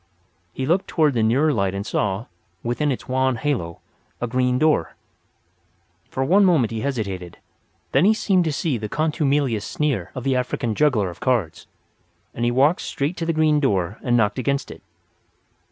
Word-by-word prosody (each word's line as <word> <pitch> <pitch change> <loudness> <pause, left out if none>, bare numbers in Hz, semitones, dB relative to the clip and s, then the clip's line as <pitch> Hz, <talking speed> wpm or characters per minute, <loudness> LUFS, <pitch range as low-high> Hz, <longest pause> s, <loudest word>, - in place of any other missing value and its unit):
He 130 - -4
looked 175 +7 +1
toward 155 -4 +2
the 115 - +1
nearer 135 +8 +3
light 100 -4 0
and 100 +1 -4
saw, 105 0 -1 0.4
within 130 +5 0
its 130 - -5
wan 130 0 +1
halo, 110 - -3 0.4
a - - -1
green 125 +1 +1
door. 150 - +1 1.1
For 130 - -2
one 195 +8 +5
moment 160 - +3
he 110 -1 -3
hesitated; 100 -10 -4 0.5
then - - +4
he 215 +2 +5
seemed 190 -4 +2
to 160 - 0
see 145 -4 -1
the 105 -1 -5
contumelious 145 - 0
sneer 135 - -2
of 130 - -5
the 135 -1 +1
African 125 -2 -1
juggler 110 -8 +2
of 85 - -14
cards; 105 -11 -1 0.7
and - - -11
then 120 - +1
he - - +3
walked 140 +7 +3
straight 145 +6 -2
to 165 - -3
the - - +2
green 155 -1 +3
door 100 - 0
and 120 -1 +2
knocked 105 0 +1
against 140 +2 -1
it. - - -11
130 Hz, 180 wpm, -22 LUFS, 110-150 Hz, 1.1 s, one